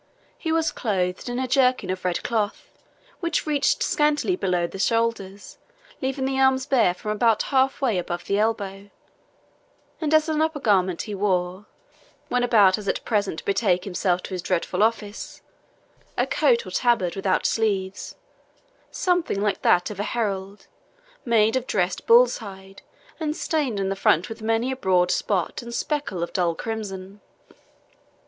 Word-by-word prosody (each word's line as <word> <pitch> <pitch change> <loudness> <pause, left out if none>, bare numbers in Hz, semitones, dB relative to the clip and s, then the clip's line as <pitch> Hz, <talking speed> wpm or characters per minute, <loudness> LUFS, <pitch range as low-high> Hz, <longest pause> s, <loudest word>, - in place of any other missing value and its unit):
He 325 - -4
was 325 0 +1
clothed 185 -1 -2
in 245 - -3
a 260 0 -1
jerkin 255 -7 +2
of 185 0 -5
red 180 -1 -1
cloth, 220 -3 -2 0.5
which 335 -2 -1
reached 295 -2 +1
scantly 300 +4 +1
below 180 - 0
the 190 +3 -7
shoulders, 205 -2 -1 0.4
leaving 265 0 -1
the 265 0 -1
arms 265 -1 +3
bare 235 -10 +3
from 210 +3 -4
about 225 +1 +2
half 265 +1 +2
way 230 -9 +1
above 175 0 -5
the 200 +1 0
elbow; 205 -2 -2 1.1
and 310 -2 -1
as 310 0 +4
an 310 -1 0
upper 315 -1 0
garment, 190 -7 +1
he 210 - -6
wore, 190 0 -1 0.6
when 250 0 +1
about 210 -5 +5
as 205 - -9
at - - -2
present 205 -7 0
to - - -8
betake 190 -3 +1
himself 180 -1 -1
to - - -8
his 180 - -3
dreadful 180 +1 -1
office, 215 -1 -2 0.7
a - - +2
coat - - +2
or - - -8
tabard 230 -9 +1
without 195 -1 0
sleeves, 200 -3 -1 0.7
something 355 - 0
like 205 -1 0
that 180 +3 +3
of 200 - -8
a 205 - -3
herald, 200 -2 -3 0.6
made 225 -1 +3
of 255 -1 -1
dressed 180 -2 -1
bull's 240 +1 +6
hide, 195 -3 -11 0.4
and 310 -1 -2
stained 280 -10 -1
in 195 -1 -1
the 195 - -1
front 180 -3 +2
with 225 0 -8
many 225 +3 0
a - - -2
broad 180 -7 +2
spot 190 +1 -1
and 235 0 -7
speckle 285 - -2
of 170 - -5
dull 175 -3 +1
crimson. 200 -2 -6
210 Hz, 165 wpm, -24 LUFS, 190-255 Hz, 1.1 s, bull's